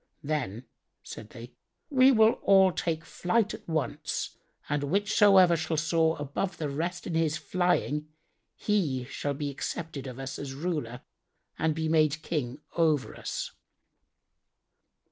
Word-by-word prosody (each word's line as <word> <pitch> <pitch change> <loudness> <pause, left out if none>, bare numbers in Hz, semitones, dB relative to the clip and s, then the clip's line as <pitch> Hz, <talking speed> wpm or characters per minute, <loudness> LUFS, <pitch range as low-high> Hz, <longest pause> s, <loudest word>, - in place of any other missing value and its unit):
"Then," 130 -6 -3 0.4
said 110 - -9
they, 120 -1 -11 0.4
"we 265 -1 +6
will 220 -2 +4
all 190 -1 +6
take 165 -1 -2
flight 205 +4 0
at - - -10
once 150 -2 -2 0.3
and 145 0 0
whichsoever 195 0 +5
shall 160 0 -2
soar 160 0 +2
above 145 +7 -3
the 150 -2 -2
rest 170 +5 -3
in 175 - -4
his 160 -1 +1
flying, 175 -4 0 0.5
he 155 -12 0
shall 140 +2 -3
be 145 0 -3
accepted 140 0 -5
of 125 -1 -7
us 135 0 -6
as 135 -2 -6
ruler 140 -6 -3 0.6
and 160 -1 +1
be 160 0 -1
made 155 -1 +2
King 145 -3 -3
over 155 -5 +1
us." - - -4
155 Hz, 135 wpm, -28 LUFS, 140-175 Hz, 0.6 s, we